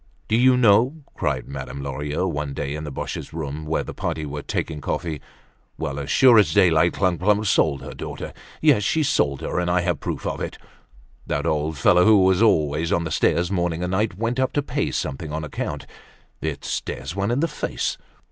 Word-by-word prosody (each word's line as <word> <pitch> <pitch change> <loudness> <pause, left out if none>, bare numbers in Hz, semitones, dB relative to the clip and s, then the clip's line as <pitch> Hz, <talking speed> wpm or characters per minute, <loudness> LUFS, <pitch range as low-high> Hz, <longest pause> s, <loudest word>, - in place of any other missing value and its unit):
"Do 110 - +1
you 125 +2 +5
know," 125 +6 +4
cried 70 -4 -2
Madame 70 0 -6
Lorilleux, 75 +6 -2
one 75 -4 -3
day 70 -1 -3
in 75 +1 -5
the 75 - -5
Boches' - - -5
room, 75 -1 -5
where 75 -2 0
the - - -7
party 80 - -3
were 75 0 -5
taking 75 +1 -3
coffee; 80 +1 -3 0.6
"well, 70 +1 -3
as 70 -1 -5
sure 125 -4 +7
as 105 - +2
daylight, 85 -1 +4
Clump 90 -3 0
clump 105 +2 +2
sold 75 -8 +2
her - - -7
daughter. - - -7 0.3
Yes 105 - +5
she 155 +10 +1
sold 70 - +1
her, - - -2
and 90 0 0
I 90 0 +2
have 90 0 -1
proof - - -4
of - - -3
it! - - -4 0.7
That - - -1
old 75 0 -1
fellow, 90 +6 +5
who 105 -2 +6
was 95 +1 +3
always 80 -6 +2
on 85 - +2
the 80 - -4
stairs 85 +4 +1
morning 85 -2 -1
and 90 - -2
night, 100 -1 0
went 115 +3 -1
up 130 0 +1
to 145 - 0
pay - - -1
something 75 +3 -4
on 80 +1 -3
account. 75 - -4 0.6
It 75 -3 -4
stares 65 +7 -4
one 100 +1 -1
in 120 +3 +1
the 165 - +2
face. 150 - -3
85 Hz, 205 wpm, -23 LUFS, 75-100 Hz, 0.7 s, sure